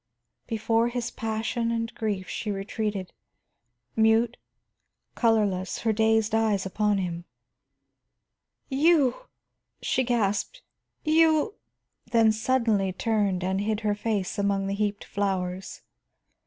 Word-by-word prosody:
Before 225 Hz, +1 st, +1 dB
his 240 Hz, 0 st, -3 dB
passion 225 Hz, +1 st, -2 dB
and 230 Hz, 0 st, -2 dB
grief 205 Hz, -4 st, -3 dB
she 215 Hz, -, -4 dB
retreated, 200 Hz, -1 st, -3 dB, 0.8 s
mute, 225 Hz, +2 st, +3 dB, 0.8 s
colorless, 210 Hz, -5 st, +1 dB
her 225 Hz, -1 st, +1 dB
dazed 220 Hz, 0 st, +2 dB
eyes 220 Hz, -3 st, +2 dB
upon 210 Hz, +2 st, +1 dB
him. 175 Hz, -2 st, -3 dB, 1.4 s
"You!" 300 Hz, -, +2 dB, 0.5 s
she 260 Hz, -, 0 dB
gasped, 235 Hz, -, -1 dB, 0.4 s
"You 320 Hz, +4 st, +3 dB, 0.3 s
" -, -, -32 dB
then 225 Hz, -1 st, +5 dB
suddenly 220 Hz, -4 st, +1 dB
turned 200 Hz, -2 st, 0 dB
and 190 Hz, +1 st, 0 dB
hid 215 Hz, +1 st, -1 dB
her 210 Hz, -1 st, +1 dB
face 205 Hz, -2 st, -2 dB
among 200 Hz, -1 st, +1 dB
the 195 Hz, -, -2 dB
heaped 205 Hz, 0 st, -1 dB
flowers. 190 Hz, -2 st, -3 dB
220 Hz, 110 wpm, -26 LUFS, 200-230 Hz, 1.4 s, then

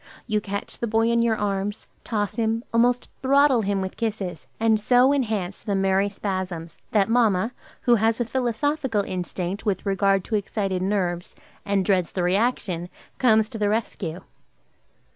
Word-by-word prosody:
You 215 Hz, -2 st, 0 dB
catch 200 Hz, 0 st, -5 dB
the 235 Hz, -, -1 dB
boy 225 Hz, +1 st, +2 dB
in 235 Hz, 0 st, +3 dB
your 230 Hz, -1 st, +2 dB
arms, 205 Hz, 0 st, -2 dB, 0.2 s
toss 205 Hz, -3 st, -1 dB
him, 225 Hz, 0 st, 0 dB
almost 245 Hz, +1 st, +2 dB
throttle 275 Hz, -2 st, +4 dB
him 200 Hz, -1 st, 0 dB
with 190 Hz, 0 st, -5 dB
kisses, 200 Hz, -8 st, -3 dB
and 220 Hz, -1 st, +3 dB
so 250 Hz, +5 st, +5 dB
enhance 215 Hz, -9 st, -1 dB
the 200 Hz, -, -2 dB
merry 195 Hz, +1 st, +2 dB
spasms, 185 Hz, -5 st, -4 dB
that 205 Hz, -3 st, +3 dB
mamma, 225 Hz, -2 st, +2 dB, 0.3 s
who 240 Hz, -, +4 dB
has 225 Hz, +1 st, +2 dB
a 240 Hz, -, +1 dB
philosophical 250 Hz, 0 st, 0 dB
instinct 185 Hz, +1 st, -4 dB
with 200 Hz, -2 st, -1 dB
regard 195 Hz, -1 st, +2 dB
to 220 Hz, -, -2 dB
excited 195 Hz, -2 st, -1 dB
nerves, 185 Hz, -3 st, -1 dB, 0.3 s
and 200 Hz, -2 st, +1 dB
dreads 185 Hz, -3 st, +1 dB
the 180 Hz, -, -1 dB
reaction, 180 Hz, -3 st, 0 dB, 0.3 s
comes 220 Hz, -4 st, +4 dB
to 225 Hz, -, -7 dB
the 205 Hz, -1 st, +2 dB
rescue. 195 Hz, -6 st, -2 dB
205 Hz, 160 wpm, -24 LUFS, 190-230 Hz, 0.3 s, so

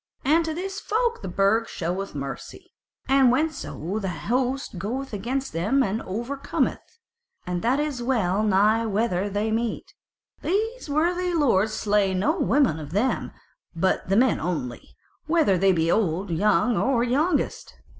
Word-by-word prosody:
And 320 Hz, +5 st, +4 dB
to 320 Hz, -, -2 dB
this 385 Hz, +3 st, -4 dB
folk 470 Hz, +3 st, -1 dB
the 195 Hz, -, -5 dB
Burg 200 Hz, +5 st, +1 dB
showeth 180 Hz, +1 st, -4 dB
mercy, 140 Hz, -1 st, -7 dB, 0.3 s
and 270 Hz, -2 st, +5 dB
whenso 250 Hz, -, -2 dB
the 195 Hz, -3 st, -3 dB
host 245 Hz, -, -2 dB
goeth 255 Hz, +7 st, -4 dB
against 255 Hz, +7 st, -3 dB
them 210 Hz, +12 st, +2 dB
and 215 Hz, +1 st, -2 dB
over 235 Hz, +9 st, -4 dB
cometh 280 Hz, -, -2 dB, 0.5 s
(and 180 Hz, -1 st, -2 dB
that 250 Hz, +5 st, +1 dB
is 295 Hz, -4 st, -2 dB
well 215 Hz, -6 st, +1 dB
nigh 215 Hz, +2 st, +3 dB
whenever 205 Hz, -2 st, 0 dB
they 205 Hz, +2 st, -1 dB
meet) 230 Hz, +1 st, -2 dB, 0.5 s
these 440 Hz, +1 st, -2 dB
worthy 350 Hz, +4 st, +1 dB
lords 220 Hz, -, +2 dB
slay 205 Hz, -3 st, +1 dB
no 305 Hz, -, +1 dB
woman 275 Hz, -, +2 dB
of 150 Hz, +1 st, -8 dB
them, 220 Hz, +7 st, 0 dB, 0.4 s
but 185 Hz, +2 st, 0 dB
the 195 Hz, -, +3 dB
men 250 Hz, 0 st, +3 dB
only, 155 Hz, -8 st, -4 dB, 0.3 s
whether 315 Hz, -, +3 dB
they 190 Hz, +2 st, +4 dB
be 165 Hz, -2 st, +1 dB
old 185 Hz, -2 st, 0 dB
or -, -, 0 dB
young 210 Hz, +6 st, +2 dB
or 250 Hz, -3 st, +2 dB
youngest. 290 Hz, +6 st, 0 dB
225 Hz, 155 wpm, -25 LUFS, 190-275 Hz, 0.5 s, and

